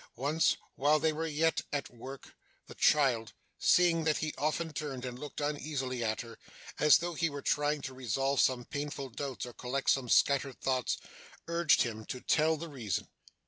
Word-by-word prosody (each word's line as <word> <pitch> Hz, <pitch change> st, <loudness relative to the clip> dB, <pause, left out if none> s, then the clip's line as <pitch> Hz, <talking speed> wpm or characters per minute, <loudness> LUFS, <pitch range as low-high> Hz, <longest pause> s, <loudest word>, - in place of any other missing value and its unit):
Once, 145 Hz, +6 st, +2 dB, 0.2 s
while 150 Hz, +3 st, +3 dB
they 160 Hz, +1 st, +2 dB
were 160 Hz, +2 st, -2 dB
yet 160 Hz, +1 st, +1 dB
at 145 Hz, -3 st, -3 dB
work, 130 Hz, +3 st, -10 dB, 0.3 s
the -, -, -11 dB
child, 130 Hz, -7 st, +3 dB, 0.3 s
seeing 170 Hz, -2 st, +4 dB
that 155 Hz, -1 st, +2 dB
he 155 Hz, 0 st, -2 dB
often 155 Hz, +2 st, -1 dB
turned 135 Hz, -4 st, -4 dB
and 125 Hz, 0 st, -6 dB
looked 150 Hz, 0 st, -7 dB
uneasily 145 Hz, -4 st, -2 dB
at 110 Hz, -1 st, -1 dB
her, 115 Hz, -1 st, -11 dB, 0.4 s
as 150 Hz, -1 st, +7 dB
though 175 Hz, 0 st, -3 dB
he 165 Hz, +1 st, 0 dB
were 145 Hz, -1 st, -7 dB
trying 145 Hz, 0 st, +1 dB
to 130 Hz, -, -5 dB
resolve 130 Hz, +2 st, -1 dB
some 125 Hz, -2 st, +2 dB
painful 145 Hz, -1 st, -4 dB
doubts 130 Hz, +1 st, -5 dB
or 120 Hz, -, -9 dB
collect 130 Hz, +4 st, 0 dB
some 130 Hz, -3 st, 0 dB
scattered 140 Hz, 0 st, +3 dB
thoughts, 130 Hz, -2 st, 0 dB, 0.5 s
urged 170 Hz, -1 st, +4 dB
him 110 Hz, -2 st, -5 dB
to 125 Hz, -, -6 dB
tell 160 Hz, +4 st, +2 dB
the 170 Hz, +2 st, -6 dB
reason. 120 Hz, -, -3 dB
140 Hz, 180 wpm, -31 LUFS, 130-155 Hz, 0.5 s, as